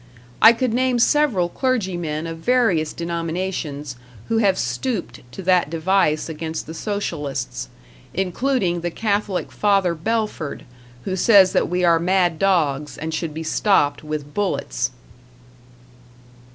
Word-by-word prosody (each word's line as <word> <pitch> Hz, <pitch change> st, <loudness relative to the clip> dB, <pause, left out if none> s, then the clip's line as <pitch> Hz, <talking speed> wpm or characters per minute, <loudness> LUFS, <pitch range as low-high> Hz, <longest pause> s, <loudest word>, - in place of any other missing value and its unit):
I 225 Hz, -, +10 dB
could 235 Hz, 0 st, -1 dB
name 255 Hz, 0 st, +2 dB
several 240 Hz, -8 st, +3 dB
clergymen 175 Hz, -, -2 dB
of 165 Hz, 0 st, -6 dB
various 195 Hz, -8 st, +2 dB
denominations 170 Hz, -5 st, -4 dB, 0.3 s
who 225 Hz, -, +2 dB
have 195 Hz, -4 st, +3 dB
stooped 180 Hz, -, -3 dB
to 190 Hz, -, -7 dB
that 180 Hz, -3 st, +3 dB
device 165 Hz, -1 st, +1 dB
against 160 Hz, 0 st, -5 dB
the 160 Hz, -, -8 dB
Socialists; 150 Hz, -, -4 dB, 0.4 s
including 190 Hz, -1 st, 0 dB
the 175 Hz, -, -2 dB
Catholic 200 Hz, 0 st, -2 dB
Father 195 Hz, -4 st, +2 dB
Belford, 210 Hz, -3 st, -3 dB, 0.4 s
who 190 Hz, -, -2 dB
says 190 Hz, -1 st, +6 dB
that -, -, +1 dB
we 180 Hz, +1 st, 0 dB
are 170 Hz, -1 st, +4 dB
mad 175 Hz, -2 st, +1 dB
dogs 150 Hz, -7 st, +1 dB
and 160 Hz, +1 st, -4 dB
should 160 Hz, 0 st, -2 dB
be 160 Hz, -, -4 dB
stopped 160 Hz, -3 st, +2 dB
with 150 Hz, -1 st, -5 dB
bullets. 190 Hz, -, -1 dB
180 Hz, 125 wpm, -21 LUFS, 160-205 Hz, 0.4 s, I